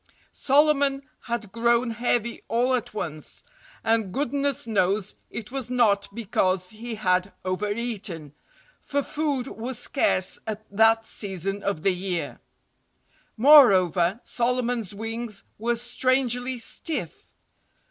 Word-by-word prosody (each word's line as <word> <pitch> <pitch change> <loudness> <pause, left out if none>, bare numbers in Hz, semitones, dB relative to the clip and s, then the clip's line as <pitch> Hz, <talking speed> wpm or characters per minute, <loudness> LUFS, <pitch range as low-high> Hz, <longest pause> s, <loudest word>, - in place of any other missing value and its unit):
Solomon 280 -1 +3 0.2
had 230 -4 -3
grown 235 +2 +2
heavy 235 0 -1
all 245 +3 +1
at 250 -3 -1
once—and 220 - -4
goodness 280 +2 -1
knows 200 -2 +1 0.2
it 220 0 -7
was 265 -3 -4
not 220 -6 +2
because 185 -5 0
he 225 +1 -6
had 185 -2 +1
overeaten, 200 - -3 0.5
for 285 0 -1
food 290 -5 -1
was 245 0 -5
scarce 240 -7 0
at 215 0 -5
that 225 +1 +4
season 195 -1 -3
of 195 -5 -2
the 195 - +3
year. 180 -1 -4 1.0
Moreover, 200 - +6
Solomon's 240 -4 -1
wings 225 0 -3 0.2
were 235 +2 0
strangely 250 +1 0
stiff. 235 - -4
230 Hz, 105 wpm, -25 LUFS, 200-250 Hz, 1.0 s, Moreover